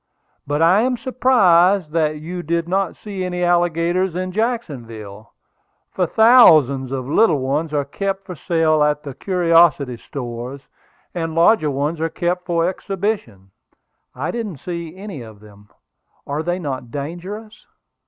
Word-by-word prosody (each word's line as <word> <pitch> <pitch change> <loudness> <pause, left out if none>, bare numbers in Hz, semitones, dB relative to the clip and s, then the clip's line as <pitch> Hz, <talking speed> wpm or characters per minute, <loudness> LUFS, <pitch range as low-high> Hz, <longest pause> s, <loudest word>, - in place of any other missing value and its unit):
But 145 +3 +1
I 180 +5 +5
am 250 +1 0
surprised 200 - +3
that 155 -2 0
you 175 +3 -6
did 170 0 -2
not 190 0 -1
see 200 -3 -6
any 180 -1 -3
alligators 175 +1 +1
in 185 0 -3
Jacksonville, 115 - -4 0.6
for 180 -2 0
thousands 155 - +5
of 130 -2 -4
little 165 +1 +3
ones 140 +4 -2
are 145 -2 -1
kept 195 +6 -4
for 180 - -7
sale 160 -1 +1
at 150 0 +1
the 140 -3 -7
curiosity 165 -7 +2
stores, 125 +1 -7 0.5
and 165 -2 -3
larger 165 -1 +4
ones 145 +4 -2
are 165 - 0
kept 175 +2 -2
for 170 -1 +1
exhibition." 185 - -4 0.6
"I 135 +5 -3
didn't 225 -7 -4
happen 175 +6 -7
to 170 -1 -5
see 180 - -17
any 195 -8 -8
of 110 -3 -12
them. 105 -1 -18 0.6
Are 145 +2 -3
they 175 +2 -2
not 135 -8 -5
dangerous?" 180 - -7
165 Hz, 150 wpm, -20 LUFS, 140-185 Hz, 0.6 s, I